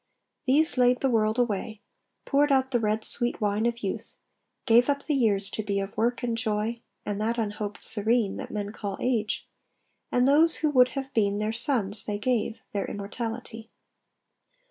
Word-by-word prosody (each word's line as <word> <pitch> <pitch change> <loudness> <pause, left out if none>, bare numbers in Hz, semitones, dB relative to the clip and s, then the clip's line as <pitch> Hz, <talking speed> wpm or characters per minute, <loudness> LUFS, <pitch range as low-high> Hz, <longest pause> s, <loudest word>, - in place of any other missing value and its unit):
These 290 +1 +3
laid 250 0 +4
the 270 - +2
world 220 0 +2
away; 220 -2 -1 0.5
poured 290 +1 +2
out 265 -1 +2
the 240 - +2
red 215 0 0
Sweet 240 0 +3
wine 210 +1 +1
of 235 -1 -3
youth; 195 - -4 0.5
gave 240 +4 +5
up 280 0 0
the 305 - 0
years 215 -7 +2
to - - -3
be 200 -1 -1
Of 195 0 -5
work 240 +2 0
and 235 -1 0
joy, 225 0 -2 0.2
and 205 0 -3
that 230 +2 0
unhoped 210 -2 -3
serene, 220 -1 0
That - - -6
men 205 -1 -4
call 200 -2 -5
age; 230 -4 -1 0.7
and 250 +1 +3
those 315 +4 +5
who 300 - +2
would 255 -2 +4
have 270 0 -4
been, 205 -2 +1
Their 215 +1 -1
sons, 225 -4 +1
they 205 -1 -3
gave, 225 0 -1
their 200 -1 -1
immortality. 225 +2 -6
225 Hz, 175 wpm, -27 LUFS, 210-250 Hz, 0.7 s, gave